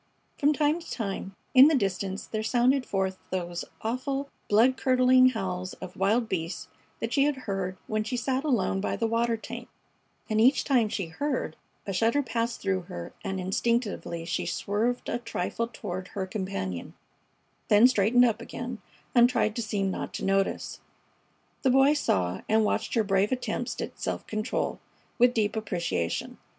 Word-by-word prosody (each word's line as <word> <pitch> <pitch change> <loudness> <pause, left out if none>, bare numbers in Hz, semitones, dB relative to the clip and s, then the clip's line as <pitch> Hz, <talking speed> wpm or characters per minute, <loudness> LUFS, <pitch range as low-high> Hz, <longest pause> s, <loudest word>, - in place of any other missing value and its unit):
From 290 +1 +4
time 300 +2 +2
to 340 - -11
time 195 -3 -4 0.2
in 265 +2 +9
the 315 - +4
distance 195 -3 -1
there 215 - -3
sounded 250 +4 +2
forth 190 -1 -1
those 175 -2 -3 0.2
awful 270 +4 -2 0.2
blood 230 +5 +5
curdling 255 0 +5
howls 185 -5 -3
of 185 -1 -9
wild 220 +5 +2
beasts 170 -3 -3 0.3
that 225 +1 -3
she 275 +2 +4
had 295 -1 +1
heard 190 -2 -2
when 215 0 -1
she 250 +3 -3
sat 265 +2 -1
alone 235 -9 +1
by - - -1
the 230 - -1
water 230 +1 +1
tank, - - -8 0.6
and 215 -1 +2
each 255 +3 +5
time 245 -6 +2
she 195 -3 -2
heard 180 - -2 0.3
a 195 - -3
shudder 230 +9 +2
passed 230 -1 -2
through 190 -1 0
her 85 0 -7
and 190 0 -3
instinctively 195 -3 -1
she 170 - -2
swerved 225 +5 -1
a - - -1
trifle 230 0 -2
toward 185 -5 -6
her 195 -1 -4
companion, 185 - -4 0.7
then 210 +4 +7
straightened 245 +1 +4
up 230 -1 0
again 240 0 -6 0.3
and 240 0 +6
tried 225 -3 +1
to 235 - -1
seem 205 -3 -1
not - - -5
to - - -3
notice. 195 0 0 0.8
The 265 - +3
Boy 270 +3 +5
saw 90 - 0
and 220 0 +4
watched 220 +3 -1
her 225 - +3
brave 195 0 +2
attempts 255 -1 -2
at - - -5
self - - -3
control 215 +2 -2 0.4
with 245 +1 +5
deep 215 -1 +1
appreciation. 170 - -2
220 Hz, 165 wpm, -28 LUFS, 195-250 Hz, 0.8 s, in